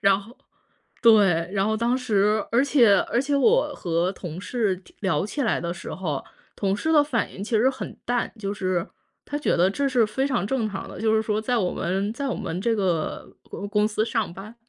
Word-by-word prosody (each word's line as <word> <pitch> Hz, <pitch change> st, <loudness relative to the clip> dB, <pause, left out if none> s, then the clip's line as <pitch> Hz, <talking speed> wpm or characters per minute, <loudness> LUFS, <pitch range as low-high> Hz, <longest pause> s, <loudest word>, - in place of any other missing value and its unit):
然 195 Hz, 0 st, +4 dB
后 230 Hz, +6 st, -15 dB, 0.7 s
对， 195 Hz, -7 st, +5 dB
然 195 Hz, 0 st, +1 dB
后， 220 Hz, 0 st, 0 dB
当 240 Hz, +3 st, +1 dB
时 210 Hz, -3 st, +1 dB
而 240 Hz, +3 st, +4 dB
且 250 Hz, -8 st, +5 dB
而 240 Hz, -, +2 dB
且 285 Hz, +1 st, -2 dB
我 470 Hz, -, +3 dB
和 175 Hz, +1 st, -1 dB
同 175 Hz, -3 st, -7 dB
事 200 Hz, -3 st, -1 dB, 0.2 s
聊 185 Hz, -4 st, 0 dB
起 280 Hz, +6 st, -3 dB
来 220 Hz, -, +1 dB
的 170 Hz, 0 st, -3 dB
时 175 Hz, -, -7 dB
候， 155 Hz, -7 st, -3 dB, 0.4 s
同 195 Hz, -1 st, 0 dB
事 315 Hz, +10 st, -1 dB
的 300 Hz, -, +6 dB
反 285 Hz, -6 st, -1 dB
应 190 Hz, -, -8 dB
其 225 Hz, +2 st, -1 dB
实 240 Hz, +5 st, +4 dB
很 265 Hz, 0 st, -6 dB
淡， 245 Hz, 0 st, 0 dB
就 200 Hz, -1 st, -3 dB
是 185 Hz, -4 st, -1 dB, 0.4 s
他 290 Hz, -, -4 dB
觉 295 Hz, -, +1 dB
得 175 Hz, +2 st, +4 dB
这 280 Hz, +8 st, 0 dB
是 245 Hz, -4 st, +3 dB
非 265 Hz, +6 st, -1 dB
常 240 Hz, -8 st, 0 dB
正 225 Hz, 0 st, 0 dB
常 195 Hz, -1 st, -6 dB
的， -, -, -9 dB
就 220 Hz, 0 st, +2 dB
是 220 Hz, -, +3 dB
说， 215 Hz, -1 st, -1 dB
在 245 Hz, +3 st, 0 dB
我 185 Hz, -5 st, 0 dB
们 195 Hz, +4 st, -1 dB
在 275 Hz, +4 st, -4 dB
我 255 Hz, -, -1 dB
们 170 Hz, +3 st, -4 dB
这 230 Hz, +3 st, +1 dB
个 180 Hz, -6 st, -2 dB
公 200 Hz, -, -7 dB
公 210 Hz, 0 st, +2 dB
司 215 Hz, 0 st, 0 dB
上 225 Hz, -6 st, -2 dB
班 210 Hz, +5 st, -10 dB
215 Hz, 235 characters per minute, -24 LUFS, 190-245 Hz, 0.7 s, 的